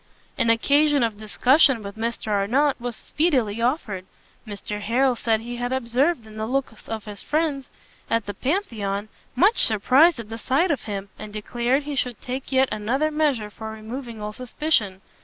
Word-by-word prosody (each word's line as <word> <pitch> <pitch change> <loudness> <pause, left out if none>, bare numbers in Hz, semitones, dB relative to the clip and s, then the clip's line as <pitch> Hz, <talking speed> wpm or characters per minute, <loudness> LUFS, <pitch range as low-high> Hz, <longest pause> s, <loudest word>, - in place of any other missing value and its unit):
An 230 - +1
occasion 285 +4 +4
of 220 -3 -1
discussion 250 +3 +4
with 200 0 -7
Mr 225 -1 -3
Arnott 245 +9 +2
very 245 0 -3
speedily 240 -5 0
offered. 230 - -1 0.4
Mr 210 0 -5
Harrel 250 +4 +2
said 225 -1 +1
he 240 +1 -6
had 245 +1 -2
observed 260 +2 +1
in 215 0 -12
the 220 0 -2
looks 255 -3 -3
of 220 -1 -4
his 210 -1 -8
friends 295 -4 -1 0.4
at 230 -1 +1
the 205 - -4
Pantheon 215 - -2 0.3
much 390 - +4
surprise 260 - +5
at 230 -2 -8
the 225 0 -6
sight 290 - +2
of 290 - -1
him, 200 -2 -5
and 210 - -8
declared 240 +6 0
he 290 0 -4
should 250 -4 -1
take 260 +2 -5
yet 265 0 +4
another 260 +9 0
measure 285 -9 0
for 220 +1 -7
removing 225 +2 -7
all 210 0 -5
suspicion. 235 -6 -1
235 Hz, 175 wpm, -24 LUFS, 215-275 Hz, 0.4 s, surprise